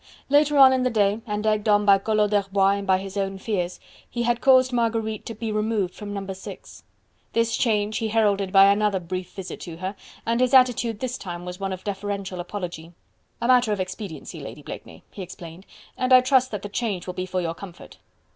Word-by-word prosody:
Later 290 +1 +4
on 265 -1 +8
in 260 - +1
the 255 - +2
day, 210 -1 +1
and 210 0 -3
egged 215 0 +1
on 205 0 +4
by 200 -1 +6
Collot 210 0 +1
d'Herbois 195 -1 +2
and 200 - -7
by 190 -1 +4
his 195 +1 -7
own 195 -1 -2
fears, 185 -3 -3 0.3
he 240 -1 -2
had 240 0 0
caused 255 -1 +5
Marguerite 225 -2 -1
to 230 - -6
be 225 +1 -4
removed 215 -3 -1
from 205 -1 -8
No. 195 -1 -4
6. 190 - -11 0.5
This 230 0 +1
change 215 -3 0
he 225 - -1
heralded 205 -3 +1
by 195 0 +7
another 205 -1 +1
brief 185 +1 -5
visit 190 -2 -7
to 165 -3 -8
her, 190 +3 -4 0.3
and 235 +2 +1
his 255 +1 +3
attitude 240 -4 +3
this 255 0 -3
time 175 -2 -7
was 180 +1 -7
one 195 -1 -3
of 185 0 -6
deferential 200 -2 -4
apology. 175 -3 -6 0.5
"A 235 - -1
matter 250 -3 +4
of 205 - -1
expediency, 185 -4 -6
Lady - - -9
Blakeney," - - -10
he - - -8
explained, 175 0 -10 0.3
"and 255 0 -1
I 255 0 +9
trust 255 0 +3
that 210 -2 -5
the 205 - -5
change 200 -4 -2
will 180 - -5
be 185 +1 -4
for 185 0 -2
your 165 -2 -2
comfort." 180 0 -12
205 Hz, 210 wpm, -24 LUFS, 190-230 Hz, 0.5 s, I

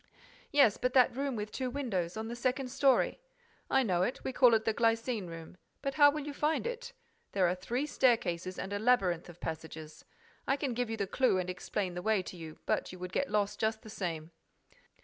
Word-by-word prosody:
"Yes, 280 -8 +5
but 250 0 -1
that 250 -2 +5
room 275 -1 -1
with 210 -1 -4
two 260 +2 -2
windows, 215 -10 -2
on 220 0 -3
the 235 - -5
second 255 +2 -1
story—" 270 - +3 0.5
"I 265 0 +4
know 180 -6 +1
it, 240 +7 -1
we 265 - -3
call 245 -2 +6
it 220 0 0
the 225 - +2
glycine 230 -2 +1
room. 165 +1 -9 0.3
But 275 - -1
how 290 0 +7
will 295 0 -3
you 295 - -5
find 300 +6 0
it? 485 0 -5 0.4
There 190 -3 +3
are 175 - +2
three 235 +10 -2
staircases 185 - +1
and 195 - -4
a 205 - -1
labyrinth 195 -8 +2
of 175 0 -13
passages. 160 -1 -7 0.4
I 275 - +3
can 275 -3 -2
give 245 0 -1
you 225 - -3
the 200 - 0
clue 250 +1 +2
and 185 0 -1
explain 180 +1 -3
the 180 - -4
way 215 -1 +1
to 180 - -8
you, 160 -2 -9
but - - 0
you 185 - -9
would 180 0 -6
get 280 - 0
lost 205 -1 0
just 220 +1 0
the 215 - -10
same." 170 -5 -4
220 Hz, 220 wpm, -32 LUFS, 180-260 Hz, 0.5 s, how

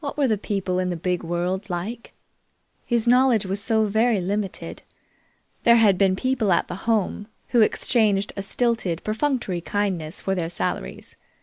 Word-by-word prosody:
What 285 - -5
were 285 -2 +3
the 220 - +2
people 195 -3 -2
in 185 0 -1
the 175 - -2
big 180 +1 -1
world 180 +4 -2
like? 200 +7 -5 0.7
His 235 -2 +1
knowledge 245 -3 +4
was 195 +2 -2
so 220 -1 +2
very 220 +1 +2
limited. 195 +2 -4 0.8
There 235 - +6
had 215 -4 +5
been 190 -2 +3
people 240 -2 0
at 170 - +2
the 180 +5 -8
Home, 210 -1 0 0.2
who 240 - +4
exchanged 210 -2 +2
a 195 - -3
stilted, 200 -4 -1
perfunctory 220 -5 -1
kindness 185 -5 -2
for 195 - -2
their 170 -3 -2
salaries. 175 - -4
205 Hz, 165 wpm, -23 LUFS, 185-230 Hz, 0.8 s, There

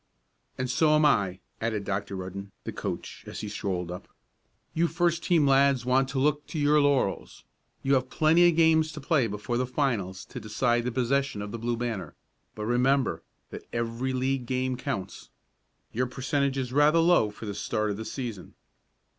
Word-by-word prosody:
"And 130 - -1
so 155 +4 +3
am 150 0 +4
I," 95 -9 +2 0.2
added 110 -2 -1
Dr. 100 0 -3
Rudden, 95 +1 -6
the - - -4
coach, - - -6
as - - -6
he 105 - -5
strolled 95 -4 -3
up. 90 +1 -8 0.7
"You 170 +1 +2
first 170 0 +1
team 170 -5 +3
lads 135 -2 +4
want 130 +1 +2
to 135 - -4
look 150 +2 +1
to - - -6
your 150 0 +4
laurels. 140 -8 0 0.4
You 135 - +2
have 130 -1 +1
plenty 165 +3 +5
of 170 - 0
games 160 -1 +4
to 155 - -7
play 140 -4 +2
before 105 +3 -3
the 125 0 0
finals 115 -9 -1
to - - -8
decide 120 +2 0
the 125 - -1
possession 130 -2 0
of 105 - -6
the 115 - -5
Blue 120 +1 -1
Banner, 110 -9 -4 0.4
but 105 - -4
remember 125 +3 +2 0.3
that - - -9
every 115 +2 -2
league 130 -1 -1
game 130 0 -1
counts. 125 -7 -5 0.6
Your 125 +3 0
percentage 135 +2 -1
is 125 -2 -3
rather 145 +3 +5
low 165 -9 +4
for 105 +2 -10
the 100 - -4
start 105 +1 -1
of 100 - -4
the 110 - -5
season." 115 -9 -6
125 Hz, 185 wpm, -27 LUFS, 105-140 Hz, 0.7 s, plenty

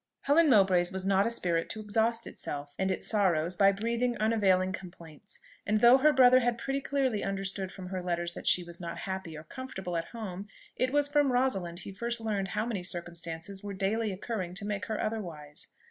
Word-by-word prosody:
Helen 310 +3 +4
Mowbray's 190 -6 +5
was 190 0 -3
not 195 +2 +3
a - - +1
spirit 170 -7 -1
to 220 - -4
exhaust 225 +2 0
itself 145 0 -6
and 190 0 +1
its 185 - -2
sorrows 180 -5 +1
by 195 +2 +5
breathing 235 +4 -1
unavailing 195 -4 +2
complaints; 175 -1 -11 0.2
and 215 +1 +1
though 240 +4 +7
her 305 +3 +5
brother 255 -2 +7
had 240 -1 0
pretty 275 +3 -2
clearly 265 -6 0
understood 195 -1 -2
from 185 -2 -8
her 185 -1 -3
letters 175 -1 -2
that - - -8
she 180 - +4
was 170 0 -9
not 170 - -5
happy 190 -4 -5
or 155 - -9
comfortable 190 -3 -6
at 165 0 -1
home, 200 -3 -7 0.3
it 255 0 0
was 290 0 +3
from 290 -2 +2
Rosalind 195 -9 0
he 195 - -7
first 235 +4 -3
learned 210 -4 -1
how 210 +3 -2
many 225 -6 -2
circumstances 170 +1 -4
were 200 -1 -5
daily 205 +3 0
occurring 190 -2 -4
to 200 +1 -5
make 205 -1 -3
her 220 -2 -2
otherwise. 165 -9 -4
195 Hz, 200 wpm, -30 LUFS, 180-230 Hz, 0.3 s, though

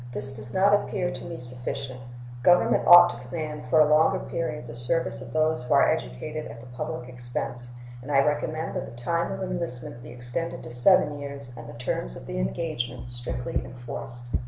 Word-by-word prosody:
This 135 0 -1
does 110 +1 -9
not 195 +6 +4
appear 185 -3 +1
to - - -7
me 170 -1 -6
sufficient. 125 +1 -2 0.4
Government 180 +6 +4
ought 175 0 +10
to - - -9
command 150 +3 -5
for 155 - +5
a 155 - +8
longer 160 +5 +4
period 155 -6 -4
the 115 - -8
services 120 +8 +2
of - - -9
those 155 -2 +1
who 125 - +2
are - - +6
educated 150 - -3
at 115 +1 -10
the 115 - -12
public 125 0 -5
expense, 120 0 -4 0.3
and 135 +4 -7
I 135 -1 +4
recommend 155 +2 -1
that - - -2
the - - -10
time 170 +5 0
of - - -4
enlistment 170 -10 -3
be 120 - -11
extended 125 +7 -5
to 120 - -8
seven 145 +3 +4
years, 140 -2 -7
and 115 -1 -9
the - - -9
terms - - -3
of - - -10
the - - -4
engagement 120 - -3
strictly 120 +1 -3
enforced. 120 0 -8
125 Hz, 195 wpm, -26 LUFS, 120-160 Hz, 0.4 s, ought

